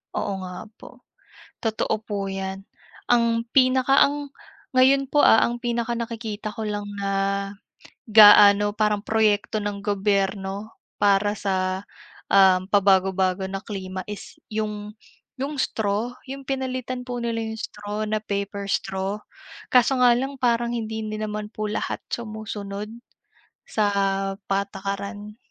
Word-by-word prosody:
Oo 200 - -1
nga 180 -1 -7 0.2
po. - - -14 0.6
Totoo 220 0 0
po 200 -2 -3
'yan, 195 0 -4 0.5
ang 235 -1 +3
pinaka 260 +1 +5
ang 290 0 -4 0.5
ngayon 270 +1 +4
po, 295 - +4
ah, 225 - +7
ang 240 0 +1
pinakanakikita 230 -3 -3
ko 225 - -6
lang 205 -1 -3 0.2
na, 200 0 -1 0.9
gaano 205 -1 +7
parang 210 -1 +1
proyekto 215 -1 +1
ng 205 -1 -3
gobyerno, 200 0 -1 0.2
para 205 0 +3
sa, 190 -1 -2 0.4
ah, 190 -2 +6
pabago-bago 190 -1 +2
na 195 +1 -5
klima 185 -2 -5
is 210 -1 -9 0.2
'yong 210 -1 -3 0.5
'yong 280 +2 -3
straw. 220 -1 -1 0.2
'Yong 275 +1 -7
pinalitan 255 -2 -3
po 245 - -3
nila 235 -1 -2
'yong 220 0 -4
straw 205 0 -6
na 215 0 -1
paper 200 -1 -4
straw. 195 +1 -1 0.6
Kaso 250 +1 +5
nga 245 -1 +7
lang 270 +3 -2
parang 235 -1 +1
hindi 220 -1 -4
din 215 0 -4
naman 210 0 -4
po 215 0 -5
lahat - - -3
sumusunod, 215 -2 -5 0.8
sa 215 - +1 0.6
patakaran. 200 +2 -3
210 Hz, 125 wpm, -24 LUFS, 200-235 Hz, 0.9 s, ah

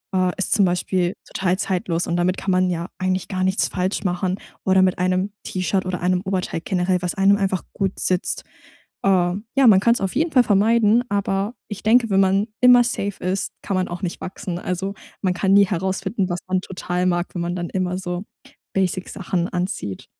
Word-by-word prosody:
äh, 185 -1 +2
ist 195 - -1
zum 205 -3 +4
Beispiel 180 0 0
total 185 -1 -1
zeitlos 180 -4 -1
und 170 - 0
damit 180 +1 +1
kann 195 - -2
man 185 0 +2
ja 170 0 -3
eigentlich 185 0 -1
gar 185 -1 -1
nichts 190 +1 +2
falsch 185 +1 -2
machen 180 0 -1 0.3
oder 190 0 +4
mit 185 -1 +1
einem 185 +2 +1
T-Shirt 185 +1 -1
oder 185 -1 -3
einem 180 0 +1
Oberteil 185 -3 -2
generell, 180 -1 0
was 180 -1 -2
einem 195 +1 +5
einfach 190 -2 -1
gut 195 -1 -2
sitzt. 185 -1 0 0.6
Äh, - - +1
ja, 195 +8 +2
man 200 -4 +7
kann's 235 +3 +2
auf 195 +2 -2
jeden 320 +4 +1
Fall 255 -2 +6
vermeiden, 225 +2 +3
aber 200 +1 -1 0.2
ich 210 0 -6
denke, 230 +1 +4
wenn 195 -1 +3
man 195 +2 +2
immer 250 -1 +7
safe 205 -4 -3
ist, 185 +2 -1
kann 195 - -2
man 185 0 0
auch 175 +1 -6
nicht 175 - -3
wachsen. 180 -1 -5
Also, 190 +2 -3 0.3
man 185 -2 +1
kann 190 +1 +1
nie 200 0 +7
herausfinden, 190 +2 -1
was 175 0 -2
man 185 0 +1
total 180 -1 -3
mag, 175 -1 0
wenn 175 - -2
man 175 +1 -2
dann 175 -1 -4
immer 185 -1 -1
so 180 +1 -4 0.5
Basic 185 -1 0
Sachen 180 -2 -2
anzieht. 175 - -4
185 Hz, 200 wpm, -22 LUFS, 180-195 Hz, 0.6 s, man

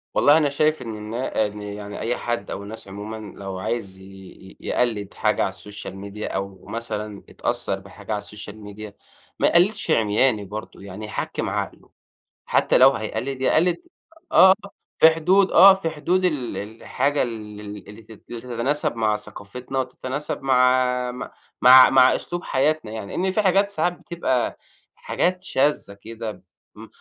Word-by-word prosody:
والله 145 +2 +6
أنا 150 -3 +2
شايف 155 0 +1
إن 115 -3 -6
النا 110 +1 -2
إن 105 0 -6
يعني 105 0 -7
أي 115 +2 -1
حد 120 0 -3
أو 100 - -5
الناس 105 0 -9
عمومًا، 105 +2 -8
لو 95 -1 -5
عايز 105 -2 -4
ي - - -13 0.4
ي 95 - -15
يقلّد 110 -5 -1
حاجة - - +1
على - - +2
السوشيال 105 -2 -9
ميديا 100 +2 -6
أو 95 -1 -5
مثلًا 105 -3 -5
اتأثّر 95 - -2
بحاجة 100 +2 -11
على 105 - +1
السوشيال 105 +1 -9
ميديا 105 0 -9 0.5
ما - - +4
يقلِّدش 200 +5 +2
عمياني 110 0 +2
برضه، 105 +3 -8
يعني 100 +2 -8
يحكِّم 110 - -3
عقله، - - -4 0.6
حتى - - +3
لو 135 +1 +8
هيقلِّد 125 +3 -4
يقلِّد 170 +6 +3 0.5
آه 190 0 +8 0.4
في 160 - +8
حدود، 180 +5 +3
آه 195 0 +9
في 190 -4 -2
حدود 175 +4 0
ال 140 -9 -1
الحاجة 125 +7 -2
ال 105 -4 -6
ال 105 -1 -9
اللي 105 +2 -11
تت 110 -1 -15
تتناسب 120 +4 -2
مع 110 -2 +1
ثقافتنا، 105 +6 -6
وتتناسب 130 +3 -4
مع 125 -1 +2
مع 125 - -7 0.3
مع 130 +1 +9
مع 130 -1 +6
أسلوب 175 +1 -5
حياتنا 135 -4 0
يعني، 110 -2 -6
لإن 190 +1 +1
في 215 +3 +1
حاجات 200 +1 +3
ساعات 180 -3 0
بتبقى 170 -9 -1 0.4
حاجات 185 +1 -1
شاذة 140 - 0
كده، 110 +2 -8 0.3
م - - -11
115 Hz, 160 wpm, -23 LUFS, 105-145 Hz, 0.6 s, آه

